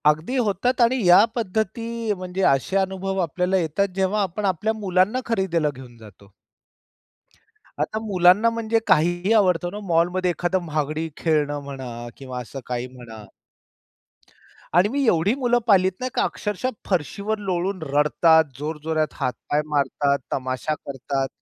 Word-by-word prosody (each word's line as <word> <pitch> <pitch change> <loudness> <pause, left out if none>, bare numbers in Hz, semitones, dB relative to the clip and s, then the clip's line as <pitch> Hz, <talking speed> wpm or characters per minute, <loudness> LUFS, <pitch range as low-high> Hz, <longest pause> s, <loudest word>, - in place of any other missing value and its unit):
अगदी 155 - -1
होतात 245 +2 +1
आणि 240 0 +3
या 180 +3 +8
पद्धती 225 +1 -2
म्हणजे 185 0 -5
असे 135 +8 -1
अनुभव 190 0 -1
आपल्याला 180 +3 0
येतात 180 +3 0
जेव्हा 195 +2 +1
आपण 200 +2 -2
आपल्या 195 +4 0
मुलांना 200 +2 +1
खरेदीला 190 -8 0
घेऊन 125 -2 -12
जातो. 105 -2 -16 1.5
आता 215 - -1
मुलांना 200 0 +4
म्हणजे 230 0 0
काहीही 175 +2 +2
आवडतं 180 -5 +3
ना 205 - -6
मॉलमध्ये. 175 +2 +2
एखादा 175 +2 -1
महागडी 155 -1 -2
खेळणं 150 -3 0
म्हणा 130 -4 -7
किंवा 130 -2 -7
असं 125 +3 -8
काही 125 0 -3
म्हणा. 120 -4 -12 1.5
आणि 185 +4 +5
मी 275 +3 0
एवढी 185 0 +3
मुलं 245 -3 +2
पाहिलीत 190 -3 +5
नाही 255 - -2
का - - +2
अक्षरशः 210 +4 -2 0.2
फरशीवर 200 +5 -1
लोळून 185 +1 -1
रडतात, 160 +2 +4 0.2
जोरजोरात 155 +1 -2
हात-पाय 145 +3 -1
मारतात, 140 -1 +1
तमाशा 130 +3 -2
करतात. 135 -1 -3
180 Hz, 135 wpm, -23 LUFS, 150-205 Hz, 1.5 s, या